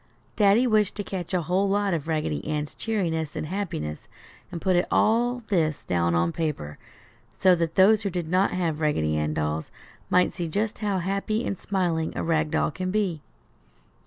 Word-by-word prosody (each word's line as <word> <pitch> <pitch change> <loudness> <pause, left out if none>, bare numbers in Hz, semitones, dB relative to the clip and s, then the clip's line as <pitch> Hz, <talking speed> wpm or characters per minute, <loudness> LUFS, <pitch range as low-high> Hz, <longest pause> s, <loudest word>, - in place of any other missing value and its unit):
Daddy 210 +3 +4
wished 215 -4 +2
to 205 - -3
catch 190 -3 -5
a 180 -3 0
whole 185 +5 +1
lot 200 -1 +1
of 160 -2 -2
Raggedy 155 - -1
Ann's 150 -1 -2
cheeriness 165 -9 -2
and - - -3
happiness 155 - -4 0.4
and 175 - -5
put 185 +1 +1
all 240 +2 +2
this 160 -7 +1
down 85 -1 +1
on 85 0 +2
paper, 140 - -4 0.6
so 185 -1 +5
that 165 -2 -1
those 205 +3 +6
who 205 - -1
did 175 -3 -3
not 185 +4 +2
have 165 -4 -1
Raggedy 80 - +1
Ann 75 0 -1
dolls 75 +1 -2 0.4
might 180 0 +3
see 175 -3 -3
just 210 +6 -2
how 205 -3 0
happy 200 +5 -1
and - - -1
smiling 175 -4 -1
a - - -2
rag 160 -2 +1
doll 160 0 +1
can 185 +4 -4
be. 185 -6 -1
175 Hz, 180 wpm, -25 LUFS, 155-200 Hz, 0.6 s, those